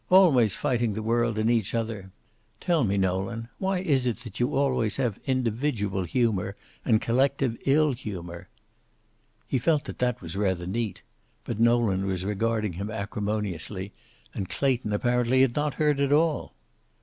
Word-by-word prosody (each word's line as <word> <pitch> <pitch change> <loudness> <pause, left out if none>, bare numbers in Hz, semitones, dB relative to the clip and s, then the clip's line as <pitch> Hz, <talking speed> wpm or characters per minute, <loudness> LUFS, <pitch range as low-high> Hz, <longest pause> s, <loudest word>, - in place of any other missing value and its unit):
"Always 145 - +5
fighting 120 -3 0
the 110 +2 -4
world 115 0 +1
and 110 +1 +1
each 115 -2 0
other. 110 -4 -3 0.5
Tell 170 -6 +2
me, 100 -2 +1
Nolan, 95 +5 -1
why 190 -1 0
is 140 -8 +1
it 120 - 0
that 110 -2 -9
you 120 - +1
always 130 -6 +1
have 120 -7 -1
individual 115 -6 0
humor 105 -3 0 0.3
and 110 -3 +3
collective 130 +1 +1
ill 150 +2 +4
humor?" 90 -7 -7 1.0
He 130 - 0
felt 155 +2 +2
that 140 - -8
that 125 -1 0
was 85 -1 -8
rather 95 -3 0
neat. 105 +2 -3 0.4
But 115 -2 -4
Nolan 115 -5 +3
was 95 -1 -2
regarding 105 0 0
him 100 +5 -5
acrimoniously, 100 -3 -3 0.4
and 95 -3 -4
Clayton 130 -6 0
apparently 120 +4 +2
had 130 -3 +3
not 150 -1 0
heard 150 -2 +2
at 140 0 +1
all. 155 +1 +1
115 Hz, 155 wpm, -27 LUFS, 100-130 Hz, 1.0 s, Always